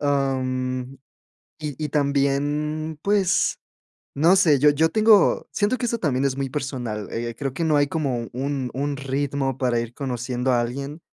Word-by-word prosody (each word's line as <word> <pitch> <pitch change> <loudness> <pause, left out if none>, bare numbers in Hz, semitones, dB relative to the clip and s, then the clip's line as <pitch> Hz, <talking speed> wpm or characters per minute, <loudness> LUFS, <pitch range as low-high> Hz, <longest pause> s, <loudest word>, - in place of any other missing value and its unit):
ah, 140 -2 +1
mm, 130 0 -3 0.7
y 150 -3 -4
y 150 -2 -3
también, 145 +2 0
pues, 195 -2 +2 0.6
no 165 +6 +5
sé, 155 -7 +4
yo 150 +2 +6
yo 160 +3 +2
tengo 215 +1 +4
siento 210 +5 +1
que 245 - -2
eso 235 -1 -1
también 135 -4 0
es 135 -1 0
muy 135 -1 -2
personal, 125 -7 -4
eh, 115 0 -3
creo 135 -2 -3
que 165 - -2
no 155 -2 +3
hay 145 -1 +3
como 135 -7 -2
un 135 0 -2
un 140 +2 -2
ritmo 135 -1 -2
para 125 -3 +1
ir 115 0 -5
conociendo 125 -1 -2
a 120 - +3
alguien, 140 +6 -4
140 Hz, 170 wpm, -23 LUFS, 130-150 Hz, 0.7 s, yo